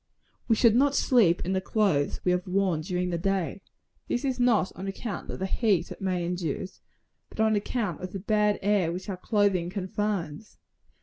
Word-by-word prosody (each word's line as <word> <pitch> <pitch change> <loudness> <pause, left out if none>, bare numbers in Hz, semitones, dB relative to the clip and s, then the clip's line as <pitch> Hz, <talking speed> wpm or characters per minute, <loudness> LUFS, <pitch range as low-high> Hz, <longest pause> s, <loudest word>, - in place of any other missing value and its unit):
We 225 - +4
should 225 0 +5
not 280 +2 +3
sleep 210 -10 +3
in 185 - -1
the 190 - 0
clothes 190 -9 +1
we 180 - +3
have 180 0 -1
worn 185 -4 +1
during 180 +2 -2
the 170 - -1
day. 195 0 -1 0.5
This 245 - -1
is 260 -2 -1
not 240 -6 +3
on 195 - -6
account 200 +1 -5
of - - -4
the 190 - -2
heat 195 -4 +1
it - - -9
may 180 -2 -1
induce, 175 +1 -4 0.5
but - - -14
on 220 0 +3
account 205 -4 -2
of 185 0 -5
the 195 - -5
bad 210 +1 +2
air 200 -4 +2
which 185 +4 -6
our 190 - -3
clothing 195 -3 +1
confines. 195 -1 -3
195 Hz, 190 wpm, -27 LUFS, 180-215 Hz, 0.5 s, should